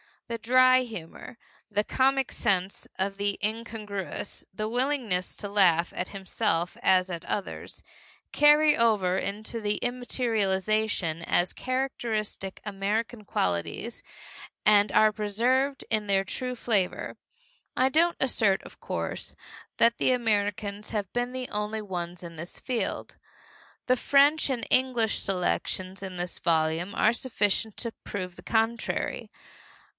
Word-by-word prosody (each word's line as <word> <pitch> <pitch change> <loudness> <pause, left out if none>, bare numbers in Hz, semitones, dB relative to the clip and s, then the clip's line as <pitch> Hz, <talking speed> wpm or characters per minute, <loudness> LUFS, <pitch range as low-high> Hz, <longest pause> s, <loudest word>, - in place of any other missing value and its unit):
The 235 - -3
dry 255 +3 +5
humor, 230 0 -7 0.3
the 210 0 +1
comic 270 +3 +2
sense 190 -1 0
of 195 +1 -1
the 200 0 0
incongruous, 210 -3 -4
the 215 +3 -3
willingness 245 -7 0
to 205 - -5
laugh 175 -4 +4
at 180 - -3
himself 190 -3 -1
as 185 0 +4
at 170 -1 -5
others, 200 - -5 0.5
carry 295 +1 +6
over 205 -6 +2
into 215 +4 -3
immaterialization 215 -5 0
as 175 +1 +2
characteristic 235 -7 -3
American 210 +2 -2
qualities 85 - -2 0.6
and 205 -1 +6
are 215 0 +5
preserved 240 +7 0
in 215 -2 +2
their 195 -1 +3
true 250 +5 -4
flavor. 210 -6 -1 0.6
I 260 +1 +3
don't 335 +5 +3
assert, 215 -7 +2
of - - -14
course, - - -4 0.4
that 235 0 +4
Americans 210 -4 0
have 210 -3 -2
been 245 0 -1
the 255 -1 -4
only 210 +1 -2
ones 175 -3 -5
in 170 -1 -9
this 170 +3 -7
field. 250 -3 -3 0.7
The 255 0 +3
French 285 +4 +4
and 255 -3 -1
English 250 -4 +2
selections 185 0 -1
in 190 -2 -6
this 175 0 -4
volume 165 +3 +1
are 220 - +4
sufficient 220 -3 0
to 230 - -2
prove 185 -3 -5
the - - -10
contrary. 225 +1 -1
210 Hz, 125 wpm, -27 LUFS, 190-245 Hz, 0.7 s, carry